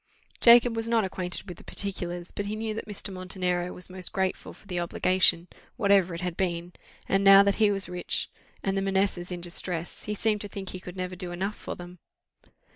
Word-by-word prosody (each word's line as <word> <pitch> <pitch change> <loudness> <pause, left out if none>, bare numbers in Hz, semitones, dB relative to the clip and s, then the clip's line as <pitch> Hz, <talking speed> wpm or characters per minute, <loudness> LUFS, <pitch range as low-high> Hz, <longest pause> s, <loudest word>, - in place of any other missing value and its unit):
Jacob 235 0 +7
was 225 0 -2
not 230 -2 +3
acquainted 185 0 -1
with 175 -2 -8
the - - -14
particulars, 175 -3 -3
but 205 - -4
he 210 - -2
knew 220 0 -3
that 220 - -5
Mr. 205 -1 -3
Montenero 180 -1 -2
was 180 - -8
most 185 -1 -5
grateful 190 -1 -2
for - - -17
the 180 -3 -3
obligation, 175 0 +2 0.3
whatever 200 -6 +3
it 170 - -6
had 180 -2 -3
been; 175 -1 -2 0.3
and 195 0 +2
now 195 0 +9
that 200 +2 +1
he 210 - +6
was 195 -1 -1
rich 180 0 -3 0.4
and 195 0 0
the 195 - +1
Manessas 190 -2 0
in 175 -1 -4
distress, 175 0 -3
he 210 - -2
seemed 210 0 +1
to 205 - -5
think 195 -1 -6
he 185 - -5
could 180 0 -9
never 185 0 -3
do 180 -1 0
enough 195 +4 -3
for - - -6
them. 175 0 -11
190 Hz, 210 wpm, -27 LUFS, 180-200 Hz, 0.4 s, now